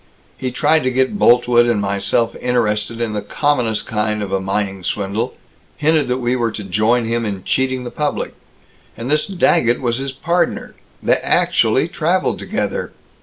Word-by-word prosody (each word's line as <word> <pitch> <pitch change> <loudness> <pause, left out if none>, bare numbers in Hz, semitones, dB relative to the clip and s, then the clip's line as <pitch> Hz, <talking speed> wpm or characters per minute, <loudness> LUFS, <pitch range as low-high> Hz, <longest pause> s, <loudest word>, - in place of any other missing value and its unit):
He 130 0 -3
tried 155 +5 +2
to 130 - 0
get 130 +10 0
Boltwood 120 0 +5
and 115 -3 +1
myself 100 +3 0
interested 115 -2 0
in 115 -2 -2
the 105 - -2
commonest 125 -7 0
kind 105 -1 -1
of 100 - -6
a 95 - +1
mining 95 0 -2
swindle 105 +6 -2 0.4
hinted 155 -1 +2
that 125 0 0
we 125 0 0
were 120 -2 0
to 105 - -5
join 110 +5 +1
him 115 +1 -1
in 100 -4 -4
cheating 130 +2 0
the 120 - -6
public. 150 -1 -2 0.6
And 120 +5 -4
this 150 0 +2
Daggett 170 -10 +2
was 120 -1 -1
his 135 0 -3
partner 170 +6 -1 0.3
they - - +3
actually - - +2
traveled - - 0
together. - - -3
120 Hz, 170 wpm, -18 LUFS, 105-130 Hz, 0.6 s, Boltwood